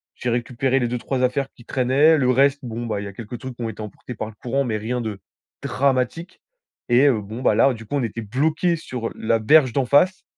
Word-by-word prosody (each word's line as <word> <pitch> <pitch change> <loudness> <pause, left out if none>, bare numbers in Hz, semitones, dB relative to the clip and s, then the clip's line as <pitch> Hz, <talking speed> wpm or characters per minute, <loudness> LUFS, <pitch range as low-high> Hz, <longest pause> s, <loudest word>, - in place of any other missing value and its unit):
J'ai 125 - -3
récupéré 125 +2 0
les 120 - 0
2-3 125 +2 -2
affaires 130 +2 0
qui 120 - -17
traînaient. 135 +6 +3
Le 125 -3 +2
reste, 140 +2 +3
bon 120 0 -5
ben, 105 -3 -2
il 100 - -5
y - - -5
a 100 - -9
quelques 115 +3 -8
trucs 130 -2 -7
qui 120 - -6
ont 115 - -2
été 110 - -8
emportés 105 +4 -8
par 110 - -4
le 110 - -10
courant, 135 +3 0
mais 115 -3 -2
rien 120 +4 -3
de 110 -4 -4 0.4
dramatique. 135 +5 -1 0.5
Et, 125 +4 +5
heu, 115 -6 +2
bon 110 +5 -8
ben - - +3
là, 135 - +4
du 115 -1 -10
coup, 145 - -4
on 140 - 0
était 115 0 -4
bloqués 155 - 0
sur 125 -8 -5
la 115 +1 0
berge 130 +3 +5
d'en 135 -2 +1
face, 180 +8 +3
125 Hz, 245 wpm, -22 LUFS, 115-135 Hz, 0.5 s, Et